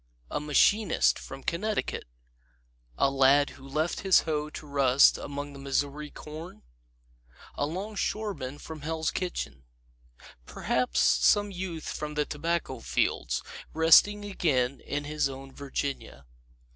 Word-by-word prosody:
A -, -, -1 dB
machinist 160 Hz, +7 st, +3 dB
from 135 Hz, 0 st, -9 dB
Connecticut? 210 Hz, +5 st, -2 dB, 0.9 s
A 135 Hz, -, +3 dB
lad 135 Hz, +1 st, +4 dB
who 135 Hz, +1 st, -13 dB
left 155 Hz, +5 st, -1 dB
his 190 Hz, -1 st, +5 dB
hoe 150 Hz, -2 st, -2 dB
to 155 Hz, -, -9 dB
rust 140 Hz, -2 st, +4 dB
among 145 Hz, 0 st, -6 dB
the 140 Hz, -, -10 dB
Missouri 140 Hz, +2 st, -2 dB
corn? 155 Hz, -, -10 dB, 0.9 s
A 145 Hz, -, -1 dB
longshoreman 195 Hz, -5 st, -3 dB
from 155 Hz, 0 st, -9 dB
Hell's 160 Hz, +1 st, -1 dB
Kitchen? 70 Hz, -, -4 dB, 0.8 s
Perhaps 125 Hz, 0 st, 0 dB
some 205 Hz, -1 st, +4 dB
youth 175 Hz, -4 st, -5 dB
from 150 Hz, 0 st, -4 dB
the 150 Hz, 0 st, +1 dB
tobacco 165 Hz, +4 st, -2 dB
fields, -, -, -1 dB, 0.3 s
resting 205 Hz, +6 st, +6 dB
again 140 Hz, -10 st, 0 dB
in 145 Hz, 0 st, -4 dB
his 150 Hz, -1 st, 0 dB
own 135 Hz, 0 st, -9 dB
Virginia. 140 Hz, -, -5 dB
150 Hz, 120 wpm, -28 LUFS, 140-170 Hz, 0.9 s, resting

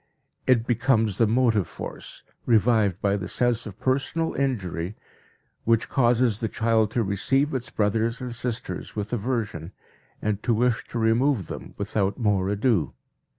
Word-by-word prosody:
It 120 Hz, -3 st, +4 dB
becomes 115 Hz, -4 st, +2 dB
the 115 Hz, -, +5 dB
motive 115 Hz, -4 st, +2 dB
force, -, -, -8 dB, 0.2 s
revived 110 Hz, -4 st, +3 dB
by 100 Hz, 0 st, +2 dB
the 95 Hz, -2 st, -5 dB
sense 120 Hz, +1 st, 0 dB
of 100 Hz, 0 st, -10 dB
personal 140 Hz, +5 st, 0 dB
injury, 100 Hz, -9 st, -2 dB, 0.7 s
which 115 Hz, 0 st, +2 dB
causes 120 Hz, -3 st, +2 dB
the 115 Hz, -, -1 dB
child 110 Hz, -2 st, +2 dB
to 115 Hz, -, +3 dB
receive 135 Hz, +9 st, +1 dB
its 130 Hz, -2 st, -3 dB
brothers 110 Hz, +3 st, 0 dB
and 125 Hz, -2 st, -5 dB
sisters 120 Hz, 0 st, -4 dB
with 105 Hz, +1 st, -4 dB
aversion 105 Hz, -8 st, -2 dB, 0.5 s
and 105 Hz, -1 st, -1 dB
to 115 Hz, -, +1 dB
wish 120 Hz, +1 st, +1 dB
to -, -, -5 dB
remove 115 Hz, 0 st, +2 dB
them -, -, -8 dB
without 100 Hz, -1 st, -1 dB
more 100 Hz, -4 st, +1 dB
ado. 105 Hz, -, +1 dB
115 Hz, 150 wpm, -25 LUFS, 105-125 Hz, 0.7 s, the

